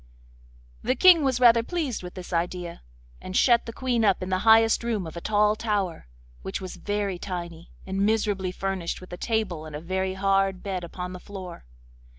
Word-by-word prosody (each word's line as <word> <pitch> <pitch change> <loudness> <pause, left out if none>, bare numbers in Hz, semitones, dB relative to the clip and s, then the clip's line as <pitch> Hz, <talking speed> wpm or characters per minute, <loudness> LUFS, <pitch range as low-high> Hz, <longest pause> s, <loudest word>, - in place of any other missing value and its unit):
The 255 - 0
King 355 -2 +7
was 260 -3 +1
rather 235 -2 +6
pleased 295 -1 -3
with 180 -1 -9
this 180 -1 -8
idea, 175 0 -2 0.4
and 185 - -3
shut 235 -2 +4
the - - -4
Queen 245 -1 0
up 195 -3 +2
in 185 - -5
the 185 0 +1
highest 225 +1 +6
room 220 -6 -1
of 160 - -8
a 170 - -6
tall 210 +1 +2
tower, 200 - -2 0.3
which 95 - -4
was 185 -2 -7
very 205 -3 -2
tiny, 170 -3 -6 0.2
and 195 +1 -1
miserably 205 -3 +1
furnished 190 -2 -3
with 185 -1 -12
a - - -5
table 195 -9 -2
and 155 - -8
a - - -4
very 190 +3 -2
hard 195 -1 +1
bed 190 -3 -3
upon 180 +1 -6
the 180 - -7
floor. 185 - -9
195 Hz, 190 wpm, -26 LUFS, 180-220 Hz, 0.4 s, King